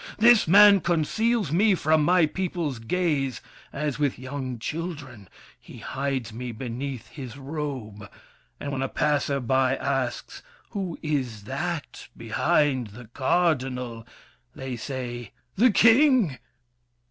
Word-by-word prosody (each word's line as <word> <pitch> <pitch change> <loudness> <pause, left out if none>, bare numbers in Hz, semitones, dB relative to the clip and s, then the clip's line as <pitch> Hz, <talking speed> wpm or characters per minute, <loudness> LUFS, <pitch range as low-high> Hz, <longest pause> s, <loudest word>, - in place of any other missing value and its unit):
This 230 -2 +6
man 200 +3 +8
conceals 175 +4 0
me 195 +4 +4
from 155 -2 +2
my 175 +1 +4
people's 165 -6 -3
gaze. 140 0 -1 0.3
As 150 -1 -3
with 145 -3 0
young 130 -1 -5
children, 145 - -6 0.3
he - - -13
hides 135 -4 -3
me 125 +2 -5
beneath 125 +1 -6
His 130 -3 -9
robe; 135 -8 -6 0.5
and 145 - -5
when 135 -1 -3
a 135 - 0
passer 145 -2 0
by 130 +1 +2
asks, 135 -3 -3 0.3
"Who 190 -6 -4
Is 130 -9 -2
that 150 +7 -5
behind 130 +2 +1
the 110 +2 -13
Cardinal?" 130 -6 0 0.5
they 130 -1 -5
say, 120 -2 -6 0.2
"The 240 +6 +5
King!" 230 - +4
140 Hz, 120 wpm, -25 LUFS, 125-170 Hz, 0.5 s, man